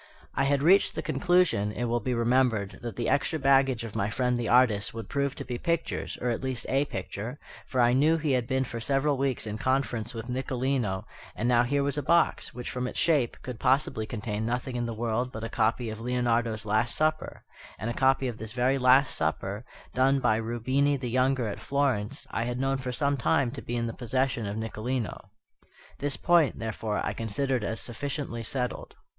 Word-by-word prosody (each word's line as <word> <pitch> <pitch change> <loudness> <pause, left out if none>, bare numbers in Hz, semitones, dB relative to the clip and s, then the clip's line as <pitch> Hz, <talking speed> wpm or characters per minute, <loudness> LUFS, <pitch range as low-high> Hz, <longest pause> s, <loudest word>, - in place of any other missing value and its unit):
I - - +1
had 140 0 +2
reached 190 +5 +5
the - - -3
conclusion, 175 - +2
it 120 - -4
will 120 0 +1
be 125 +3 -2
remembered, 115 -4 +1
that 120 -2 -5
the 120 - -2
extra 145 +3 +1
baggage 135 -4 +3
of 115 -3 -7
my 100 - 0
friend 125 +2 0
the 120 -2 -2
artist 115 -4 +3
would 115 -3 -6
prove 140 -1 -1
to 140 - -5
be 120 -1 -4
pictures, 170 -1 -2
or 125 - +1
at 115 - -2
least 130 -3 -3
a 135 +2 +2
picture, 110 +3 -5 0.3
for 130 - -2
I 120 0 +5
knew 155 +5 +4
he 155 -2 -1
had 125 -3 +1
been 130 0 +1
for 120 -2 -5
several 135 +5 +1
weeks 135 -3 -1
in 105 0 -4
conference 125 -3 -1
with 115 +1 -6
Nicolino; 125 -5 -1 0.3
and 120 - -1
now 120 -1 +5
here 140 +3 +1
was 140 +1 0
a - - -1
box, 170 +4 +2
which, 125 - -6
from 125 0 -2
its - - -6
shape, 145 -8 +2
could 125 -3 -6
possibly 130 -5 +1
contain 105 -1 -3
nothing 125 +2 -2
in 120 -1 -1
the 115 - -3
world 120 +2 -1
but 110 -2 -7
a 115 - -3
copy 115 0 0
of 110 - -7
Leonardo's 120 -2 0
Last 110 +3 +1
Supper; 155 0 -1 0.3
and 105 - -4
a 120 - -1
copy 135 +1 +2
of 115 -3 -5
this 110 -1 -5
very 130 +2 +2
Last 130 +2 +5
Supper, 95 +7 -2 0.3
done 135 +2 +3
by 110 -4 +2
Rubini 130 +5 +1
the 125 -3 -4
younger 130 0 +2
at 105 - -4
Florence, 135 -7 -1
I 115 - -1
had 120 +1 -3
known 135 +1 +1
for 130 -1 -4
some 140 +2 0
time 125 0 +2
to 140 - -6
be 120 - -4
in 120 -1 0
the 115 - -3
possession 125 -2 -1
of 100 +2 -4
Nicolino. 110 -1 -3 0.7
This 145 0 -1
point, 170 -5 +3
therefore, 110 -1 -3
I - - -1
considered 120 +3 -1
as 110 +2 -2
sufficiently 130 0 -4
settled. 125 +2 -3
125 Hz, 210 wpm, -28 LUFS, 115-135 Hz, 0.7 s, reached